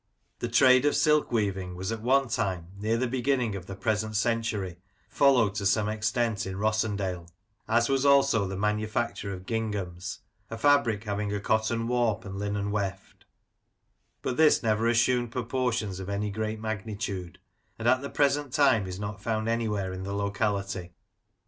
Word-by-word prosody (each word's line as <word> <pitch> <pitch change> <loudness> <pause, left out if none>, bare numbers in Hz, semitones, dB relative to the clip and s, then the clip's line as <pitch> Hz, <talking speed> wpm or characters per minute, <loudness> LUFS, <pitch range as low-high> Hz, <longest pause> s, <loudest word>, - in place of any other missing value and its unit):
The - - -2
trade 130 +2 +5
of 145 - +3
silk 150 -1 +3
weaving 95 -5 -1
was 95 +3 -3
at 115 -1 -4
one 135 +3 +3
time, 95 -7 -2
near 110 +3 0
the 130 - 0
beginning 125 -3 0
of 95 -2 -7
the 95 - -6
present 110 +1 -1
century, 110 -5 -1 0.3
followed 125 -8 +4
to 100 -1 -3
some 105 +2 +2
extent 110 0 -1
in 95 - -4
Rossendale; 100 -4 -1 0.4
as 120 +1 +3
was 135 -1 +1
also 140 -7 +4
the 95 0 -5
manufacture 105 +1 -1
of 95 -1 -7
ginghams 100 -6 -3 0.3
(a 115 - -5
fabric 120 -5 +3
having 105 -1 -2
a 105 - -1
cotton 110 +2 0
warp, 115 -3 0
and 100 0 -6
linen 100 0 -2
weft), 100 -2 -4 1.0
but 125 - -2
this 155 -3 +5
never 110 0 +2
assumed 120 0 +2
proportions 120 -5 -2
of 95 +1 -6
any 100 +1 -2
great 110 +1 -3
magnitude, 105 -4 -4 0.4
and 115 - -2
at 130 +1 +4
the 140 - -5
present 145 -1 +1
time 130 -8 +3
is 90 0 -6
not 105 -1 -5
found 110 0 -1
anywhere 105 -5 -1
in 95 - -6
the 100 +1 -4
locality. 100 -3 -2
110 Hz, 165 wpm, -28 LUFS, 100-120 Hz, 1.0 s, trade